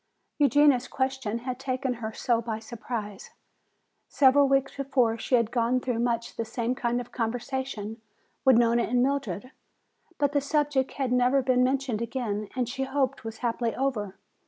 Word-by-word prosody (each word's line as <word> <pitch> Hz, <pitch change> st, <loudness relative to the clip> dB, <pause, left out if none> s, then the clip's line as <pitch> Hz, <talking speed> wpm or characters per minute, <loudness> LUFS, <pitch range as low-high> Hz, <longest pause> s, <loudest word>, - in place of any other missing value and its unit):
Eugenia's 285 Hz, -2 st, +4 dB
question 260 Hz, -4 st, -2 dB
had 250 Hz, +1 st, -5 dB
taken 260 Hz, -1 st, -1 dB
her 220 Hz, 0 st, -3 dB
so 235 Hz, +1 st, 0 dB
by 225 Hz, -2 st, -3 dB
surprise. 220 Hz, -2 st, -6 dB, 0.8 s
Several 280 Hz, +1 st, +5 dB
weeks 270 Hz, 0 st, +1 dB
before 265 Hz, -5 st, +1 dB
she 250 Hz, -, +1 dB
had 230 Hz, -2 st, +1 dB
gone 240 Hz, +1 st, +1 dB
through 245 Hz, -2 st, -2 dB
much 235 Hz, -1 st, -1 dB
the 230 Hz, -, -1 dB
same 230 Hz, +2 st, -2 dB
kind 240 Hz, -2 st, -1 dB
of 245 Hz, -, -8 dB
conversation 235 Hz, -2 st, -3 dB, 0.4 s
with 260 Hz, -3 st, +6 dB
Nona 235 Hz, 0 st, +4 dB
and 245 Hz, +1 st, +2 dB
Mildred. 270 Hz, -3 st, -2 dB, 0.7 s
But 285 Hz, -1 st, +1 dB
the 285 Hz, -1 st, +1 dB
subject 285 Hz, -2 st, 0 dB
had 265 Hz, -3 st, -2 dB
never 250 Hz, +2 st, +3 dB
been 250 Hz, -1 st, +3 dB
mentioned 260 Hz, -3 st, 0 dB
again 225 Hz, -4 st, -3 dB
and 250 Hz, -2 st, 0 dB
she 265 Hz, +2 st, -3 dB
hoped 270 Hz, 0 st, -1 dB
was 225 Hz, 0 st, -6 dB
happily 230 Hz, 0 st, -1 dB
over. 230 Hz, -8 st, -2 dB
250 Hz, 160 wpm, -27 LUFS, 230-270 Hz, 0.8 s, with